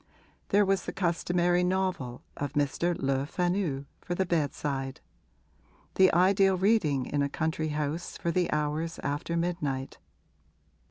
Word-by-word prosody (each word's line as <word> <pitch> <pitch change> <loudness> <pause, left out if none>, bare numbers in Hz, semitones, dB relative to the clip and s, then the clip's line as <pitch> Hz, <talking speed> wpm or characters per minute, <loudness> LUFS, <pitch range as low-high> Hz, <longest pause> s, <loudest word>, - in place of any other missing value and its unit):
There 205 +1 +4
was 195 0 +1
the - - -3
customary 175 -1 +1
novel 180 -10 -1
of 145 0 -4
Mr. 150 +4 0
Le 135 0 0
Fanu, 175 -6 -1
for 175 - -4
the 190 - +1
bedside; 145 -5 -1 0.9
the 190 0 +5
ideal 190 +2 +4
reading 180 - +2
in 145 - -1
a 140 - +1
country 160 +2 -1
house 150 +2 -3
for 170 - -1
the 180 +1 +1
hours 150 +2 -1
after 145 +4 -2
midnight. 150 -6 -2
165 Hz, 130 wpm, -29 LUFS, 145-180 Hz, 0.9 s, the